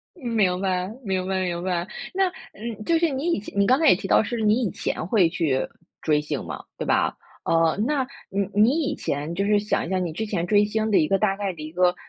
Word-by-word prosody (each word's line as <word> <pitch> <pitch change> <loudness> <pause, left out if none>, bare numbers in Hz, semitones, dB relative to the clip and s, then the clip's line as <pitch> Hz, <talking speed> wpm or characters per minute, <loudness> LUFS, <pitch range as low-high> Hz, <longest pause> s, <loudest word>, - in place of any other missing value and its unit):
明 220 - 0
白， 185 -1 0 0.2
明 190 -2 -1
白 190 0 0
明 175 -1 -2
白， 180 0 -1 0.2
那 380 0 +2 0.2
嗯， 215 0 -7
就 330 +6 +3
是 335 0 +2
你 280 +6 -1
以 - - 0
前 200 - -8
你 200 - +4
刚 255 +4 +4
才 320 -3 +4
也 180 - +7
提 195 - -6
到 - - +4
是 240 +2 -3
你 215 +3 +3
以 210 - 0
前 - - -3
会 190 -4 +4
去， 155 -6 0 0.4
追 150 -1 +2
星 150 -2 -4
嘛， - - -6
对 - - -4
吧？ - - +1 0.3
哦， 165 -1 +3
那 275 -3 0 0.2
你 200 0 -1
你 240 +10 +4
以 280 - -1
前 150 +4 -3
就 195 +3 0
是 210 +1 +3
想 210 +1 -1
一 - - -6
下 190 - +1
你 175 -3 -2
之 220 +8 -3
前 180 -5 -2
追 205 +2 +4
星 220 +1 -1
的 205 - +5
一 155 - +2
个 195 - +2
大 195 -2 +1
概 200 -1 -2
的 155 - -9
一 155 +1 -7
个 180 +1 +3
195 Hz, 270 characters per minute, -24 LUFS, 175-220 Hz, 0.4 s, 也